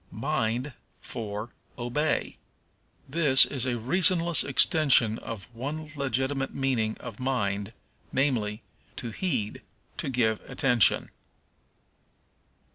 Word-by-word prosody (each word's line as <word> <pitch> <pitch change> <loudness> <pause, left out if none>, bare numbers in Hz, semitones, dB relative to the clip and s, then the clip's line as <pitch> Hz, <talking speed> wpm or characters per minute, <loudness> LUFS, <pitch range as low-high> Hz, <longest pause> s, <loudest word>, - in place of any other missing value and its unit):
Mind 125 0 -2 0.3
for 110 -1 -6 0.3
Obey. 130 +6 -1 0.7
This 140 -2 +6
is 130 -2 -3
a 120 -1 -1
reasonless 170 +6 +2
extension 135 -5 +4
of 110 -4 -8
one 150 +6 -5
legitimate 135 0 -2
meaning 120 -5 0
of 110 - -9
mind, 105 -6 -1 0.4
namely, 120 -6 0 0.3
to 120 - -5
heed, 110 - -2 0.4
to - - -3
give 110 -4 +1
attention. 125 -3 +3
130 Hz, 95 wpm, -27 LUFS, 110-140 Hz, 0.7 s, This